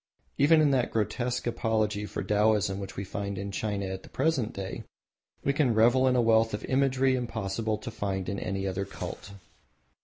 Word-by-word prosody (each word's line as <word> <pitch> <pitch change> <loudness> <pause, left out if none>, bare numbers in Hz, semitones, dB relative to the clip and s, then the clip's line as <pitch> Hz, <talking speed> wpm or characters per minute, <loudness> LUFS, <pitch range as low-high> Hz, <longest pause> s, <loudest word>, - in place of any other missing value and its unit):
Even 155 +3 +6
in 150 -2 +4
that 130 -3 +2
grotesque 120 +3 -1
apology 110 -3 0
for - - -4
Taoism 105 -2 +2
which 95 -1 -7
we 100 - -2
find 100 0 -4
in 100 +1 -4
China 100 -1 -2
at 95 0 -5
the - - -14
present 135 -6 0
day, 95 -1 -6 0.6
we 140 - +2
can 135 -6 +2
revel 120 +4 +5
in 130 - +3
a 125 - +4
wealth 115 -1 +3
of - - -7
imagery 135 0 +2
impossible 110 -3 -2
to - - -7
find 95 -2 -3
in 100 - -2
any 95 +1 -3
other 95 0 -2
cult. 100 0 -7
110 Hz, 185 wpm, -28 LUFS, 100-125 Hz, 0.6 s, Even